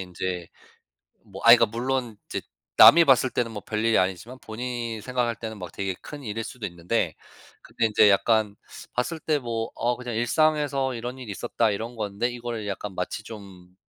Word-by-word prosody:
인제 90 -1 -4 0.8
뭐 95 -3 -11
아 115 - +11
이거 115 - +6
물론 120 0 -3
이제 - - -4 0.4
남이 170 +1 +9
봤을 130 -2 +4
때는 120 -2 -1
뭐 105 -2 -6
별일이 110 +1 +1
아니지만 95 +8 -2
본인이 115 0 -5
생각할 120 0 -1
때는 110 -2 -7
막 90 -2 -7
되게 95 -1 -3
큰 145 -1 -9
일일 115 -1 -4
수도 120 0 -7
있는데 85 -1 -1 0.5
근데 115 - -2
이제 105 -1 +5
약간 105 +1 +2 0.4
봤을 160 +7 -2
때 155 0 0
뭐 115 -3 -3
'어 120 +1 0
그냥 125 -2 -5
일상에서 140 +1 +1
이런 120 +3 -5
일이 120 -5 -7
있었다.' 115 +3 0
이런 115 +4 -5
건데 105 +2 -2
이거를 120 -3 -5
약간 100 -1 -5
마치 90 +4 -4
좀 95 -5 -12
115 Hz, 340 characters per minute, -25 LUFS, 100-125 Hz, 0.8 s, 아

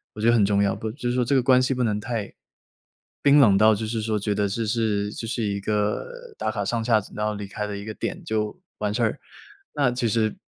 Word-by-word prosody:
我 - - -9
觉 - - 0
得 120 - +6
很 115 -3 +4
重 100 0 +3
要。 100 - +1
不 110 -1 -4
就 125 -1 -5
是 120 - +1
说 125 0 +2
这 130 +4 +1
个 130 - +3
关 130 0 +5
系 130 +1 0
不 125 - 0
能 105 -3 0
太 110 -2 -4 0.9
冰 145 +1 +6
冷 100 -8 +6
到 110 +2 +6
就 110 +1 -3
是 110 0 -2
说 110 -1 0
觉 105 0 -1
得 100 0 +1
这 110 +3 -2
是 105 -2 0
这 115 - -6
是 115 +1 -3
一 100 -1 -1
个 105 +1 -1 0.3
打 - - -1
卡 - - -2
上 115 -1 -1
下 110 -3 +3
然 105 - -1
后 105 - 0
离 105 -1 -6
开 105 +2 -4
的 105 -1 -5
一 100 - -6
个 110 - -6
点 185 - -4
就 110 -8 -2 0.2
完 105 -1 -2
事 120 - -1
儿。 115 +5 0 0.6
那 140 -5 +2
其 120 -1 -1
实 110 0 +1
110 Hz, 285 characters per minute, -24 LUFS, 105-120 Hz, 0.9 s, 得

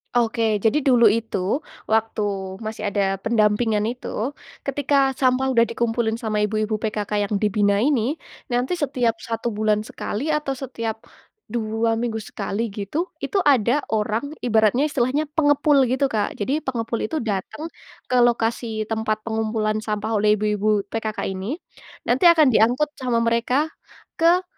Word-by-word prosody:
Oke, 230 -1 +2 0.2
jadi 265 +8 +2
dulu 240 -3 +6
itu, 225 0 0 0.5
waktu 220 0 +1 0.4
masih 215 0 -5
ada 195 -1 +1
pendampingan, 215 -1 +2
itu. 245 +2 -4 0.3
Ketika 285 +1 0 0.2
sampah 260 0 +2
udah 235 -3 +4
dikumpulin 230 0 -1
sama 215 -2 -1
ibu-ibu 215 +1 0
PKK 210 -1 -2 0.2
yang - - +1
dibina 205 -1 +2
ini, 270 +3 +1 0.3
nanti 250 +8 0
setiap 255 -7 0
1 230 +1 -3
bulan 215 0 +2
sekali, 260 +9 -4
atau 300 -2 0
setiap 230 -4 -4 0.5
2 225 0 -1
minggu 225 -1 -2
sekali, 210 +2 -3
gitu, 250 - -2 0.2
itu 400 - 0
ada 270 - +3
orang, 225 +7 -1
ibaratnya, 225 +3 +3
istilahnya 285 +4 0
pengepul 290 -1 +3
gitu, 260 +2 +1
Kak. 210 -2 -1
Jadi, 265 +9 -1
pengepul 235 -5 -3
itu 310 +2 -3
datang 225 - -4 0.4
ke - - +2
lokasi 230 -2 +1
tempat 220 -1 -1
pengumpulan 220 -1 -1
sampah 215 0 -3
oleh 210 0 +4
ibu-ibu 210 0 +1
PKK 220 -1 -3
ini. 195 +9 -4 0.5
Nanti 260 +8 +3
akan 315 -5 +6
diangkut 245 +7 +3
sama 240 -3 +1
mereka, 245 +7 +1 0.5
ke 345 +3 +4
230 Hz, 140 wpm, -22 LUFS, 215-265 Hz, 0.5 s, dulu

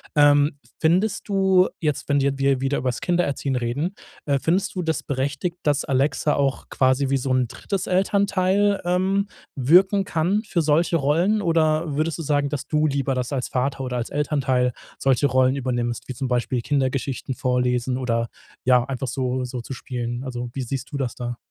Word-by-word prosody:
Ähm, 145 0 +4 0.2
findest 185 +7 +1
du 190 -2 +4
jetzt, 150 -2 -2
wenn 140 -1 +3
wir 140 0 0
wir 135 -1 +2
wieder 135 +1 0
übers 125 -1 -2
Kindererziehen 145 -6 0
reden, 125 +9 -2 0.3
äh, 140 -2 +1
findest 185 +8 0
du 185 - -1
das 160 -2 0
ist - - -7
berechtigt, 145 +6 -2
dass 145 -2 +1
Alexa 140 +2 +1
auch 140 -1 -1
quasi 130 +1 +2
wie 135 - +3
so 135 0 -3
'n 130 -2 +2
drittes 195 - -4
Elternteil, 200 +1 +2
ähm, 190 +3 +1 0.3
wirken 185 +9 +4
kann 185 +4 +1
für 175 -6 -1
solche 155 +3 +2
Rollen? 170 +9 +2
Oder 160 -2 +1
würdest 160 +1 0
du 165 - -5
sagen, 145 -1 +1
dass 145 -2 -4
du 155 0 +2
lieber 140 -1 0
das 125 +1 -2
als 135 -3 -2
Vater 135 +1 -1
oder 125 -1 -3
als 120 - -3
Elternteil 135 -4 0 0.3
solche 135 +1 +3
Rollen 130 0 +3
übernimmst, 120 -3 -2
wie 130 - -4
zum 135 +2 -3
Beispiel 125 0 0
Kindergeschichten 135 -1 -1
vorlesen 125 -1 0
oder, 115 -2 0 0.4
ja, 125 -1 +5
einfach 135 0 -4
so 130 +1 -1
so 125 -1 -5
zu 135 - -7
spielen? 120 -1 -4
Also, 125 -2 -4
wie 135 - -3
siehst 130 +2 -5
du 140 - -1
das 130 -4 -2
da? 120 -1 -5
140 Hz, 185 wpm, -23 LUFS, 130-165 Hz, 0.4 s, ja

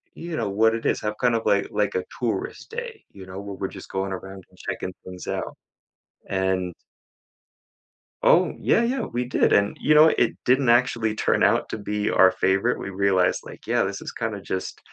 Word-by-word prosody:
you 170 -1 -6
know, 110 -3 -1
what 110 +3 +3
it 115 - -6
is." - - +1
Have 105 0 -2
kind 120 -1 +3
of 115 - -1
like 100 - +2
like 105 -2 0
a 90 - -1
tourist 120 - -3
day, 470 0 -5 0.2
you 95 - -9
know, 95 +1 -7
where 100 -1 -7
we're 95 - -1
just 95 - -11
going 95 0 -2
around 95 0 -8
and - - -24
checking 90 - -4
things 90 -1 -9
out, - - -3 0.7
and 95 -2 -1 1.5
Oh, - - +4
yeah, 230 - +3
yeah, 255 +3 0
we 125 - -2
did, 125 - +2
and 100 0 +3
you 150 - +3
know, 155 +1 +8
it 120 - +3
didn't 130 0 +3
actually 115 -2 +3
turn - - +1
out - - +2
to - - -4
be 105 0 -2
our 95 - +6
favorite, 95 +6 +1
we 100 - -5
realized, 95 -2 +2
like, - - -12
"Yeah, - - +2
this - - -4
is - - -6
kinda - - -4
just" 95 - -4
105 Hz, 200 wpm, -24 LUFS, 95-120 Hz, 1.5 s, know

